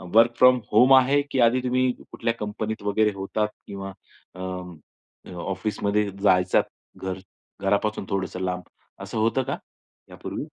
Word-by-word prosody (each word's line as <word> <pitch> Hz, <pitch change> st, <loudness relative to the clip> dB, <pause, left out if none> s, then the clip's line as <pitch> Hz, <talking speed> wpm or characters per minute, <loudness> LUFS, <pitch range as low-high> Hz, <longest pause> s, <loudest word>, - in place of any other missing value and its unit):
Work 115 Hz, +1 st, +7 dB
from 125 Hz, 0 st, +6 dB
home 125 Hz, +5 st, +6 dB
आहे 135 Hz, +2 st, +5 dB
की 130 Hz, -, 0 dB
आधी 120 Hz, +2 st, +4 dB
तुम्ही 130 Hz, 0 st, +2 dB, 0.2 s
कुठल्या 115 Hz, -, -1 dB
कंपनीत 105 Hz, +1 st, -4 dB
वगैरे 105 Hz, +1 st, +2 dB
होतात 100 Hz, +2 st, -1 dB, 0.2 s
किंवा 95 Hz, -1 st, -6 dB, 0.4 s
अं, 90 Hz, -1 st, -6 dB, 0.5 s
अ, -, -, -11 dB
ऑफिसमध्ये 100 Hz, +2 st, -1 dB
जायचात 90 Hz, -2 st, +4 dB, 0.4 s
घर 95 Hz, 0 st, -4 dB, 0.4 s
घरापासून 100 Hz, +1 st, 0 dB
थोडंसं 95 Hz, -2 st, -2 dB
लांब, 90 Hz, -1 st, -2 dB, 0.4 s
असं 100 Hz, +3 st, -6 dB
होतं 115 Hz, +4 st, +2 dB
का -, -, -3 dB, 0.5 s
यापूर्वी? -, -, -6 dB
105 Hz, 135 wpm, -25 LUFS, 95-115 Hz, 0.5 s, Work